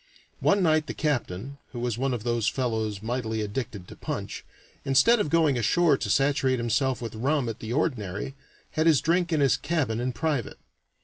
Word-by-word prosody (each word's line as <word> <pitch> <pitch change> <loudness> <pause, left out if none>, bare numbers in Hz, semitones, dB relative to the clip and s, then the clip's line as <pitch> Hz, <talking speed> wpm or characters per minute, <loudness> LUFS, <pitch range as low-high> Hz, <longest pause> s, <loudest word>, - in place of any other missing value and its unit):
One 200 -1 +3
night 155 -2 +3
the - - -5
captain 140 - -2
(who 120 - -5
was 120 -2 -1
one 135 +3 -1
of 120 -4 -3
those 120 -2 0
fellows 110 -5 -1
mightily 110 -2 -2
addicted 105 -3 -4
to - - -11
punch), - - -5 0.4
instead 135 - +4
of 180 - 0
going 155 -5 +3
ashore 155 +7 +3
to - - -4
saturate 135 -1 +2
himself 120 +2 0
with 115 - -5
rum 135 +4 0
at 115 - -4
the 110 - -6
ordinary, 120 - -2 0.4
had 155 +1 +1
his 155 -5 +6
drink 170 +1 +1
in 155 -3 +2
his 140 - +4
cabin 140 -10 -1
in 125 +1 -1
private. 145 -2 -2
130 Hz, 185 wpm, -26 LUFS, 115-150 Hz, 0.4 s, his